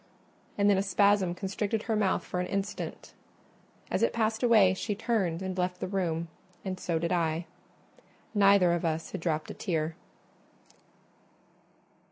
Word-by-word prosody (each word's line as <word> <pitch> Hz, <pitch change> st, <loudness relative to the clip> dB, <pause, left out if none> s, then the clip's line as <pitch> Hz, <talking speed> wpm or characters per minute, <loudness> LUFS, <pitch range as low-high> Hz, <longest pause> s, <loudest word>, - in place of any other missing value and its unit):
And 200 Hz, 0 st, +3 dB
then 200 Hz, -2 st, +4 dB
a -, -, +2 dB
spasm 200 Hz, -2 st, +3 dB
constricted 200 Hz, +3 st, -2 dB
her 225 Hz, -, -1 dB
mouth 200 Hz, -3 st, +1 dB
for 180 Hz, -, -4 dB
an 180 Hz, -, -1 dB
instant: 200 Hz, +1 st, -4 dB, 0.8 s
as -, -, 0 dB
it -, -, +2 dB
passed 220 Hz, -1 st, 0 dB
away 220 Hz, -6 st, +5 dB
she 205 Hz, +2 st, -3 dB
turned 195 Hz, -6 st, -1 dB
and 185 Hz, -1 st, -3 dB
left 180 Hz, 0 st, -1 dB
the -, -, -3 dB
room, 170 Hz, -4 st, -1 dB, 0.4 s
and 185 Hz, -1 st, -3 dB
so 170 Hz, -2 st, -1 dB
did 170 Hz, +1 st, -1 dB
I. 165 Hz, -1 st, 0 dB, 0.9 s
Neither 200 Hz, -4 st, +5 dB
of 175 Hz, -, -1 dB
us 165 Hz, -1 st, -2 dB
had 190 Hz, -, -5 dB
dropt 160 Hz, -2 st, -1 dB
a -, -, -6 dB
tear. 160 Hz, -4 st, -2 dB
190 Hz, 155 wpm, -29 LUFS, 170-205 Hz, 0.9 s, away